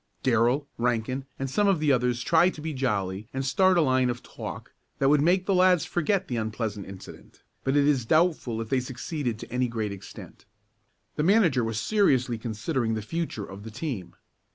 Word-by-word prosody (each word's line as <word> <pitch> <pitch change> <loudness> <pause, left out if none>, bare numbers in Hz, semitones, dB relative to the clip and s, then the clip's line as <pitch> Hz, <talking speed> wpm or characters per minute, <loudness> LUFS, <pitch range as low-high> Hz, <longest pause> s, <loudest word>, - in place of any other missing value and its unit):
Darrell, 125 +3 +2
Rankin 125 +3 -1
and 135 - -3
some 205 +10 +1
of 195 -5 +3
the 150 -2 +2
others 125 -2 +1
tried 170 +6 +3
to 150 - -9
be 155 0 -4
jolly 105 -6 -2
and 135 0 -2
start 185 +7 +3
a - - +5
line 130 -3 +2
of 120 0 -4
talk - - -8 0.2
that 135 - +2
would 145 0 +4
make 180 +4 +3
the 195 - +1
lads 185 -2 +4
forget 180 +3 0
the 120 - -2
unpleasant 110 -2 -3
incident, 95 -1 -12 0.2
but 135 +1 0
it 145 0 +4
is 135 -6 +1
doubtful 155 -8 +2
if 110 - -6
they 135 - +2
succeeded 125 -1 -4
to - - -10
any 125 +1 +1
great 110 -3 -3
extent. 100 -1 -11 0.7
The 150 - +1
manager 175 - +4
was 115 -1 -2
seriously 130 - +2
considering 115 +1 -2
the 110 - -4
future 160 -6 -3
of 95 +1 -10
the 110 - -8
team. 110 - -5
130 Hz, 195 wpm, -26 LUFS, 115-155 Hz, 0.7 s, a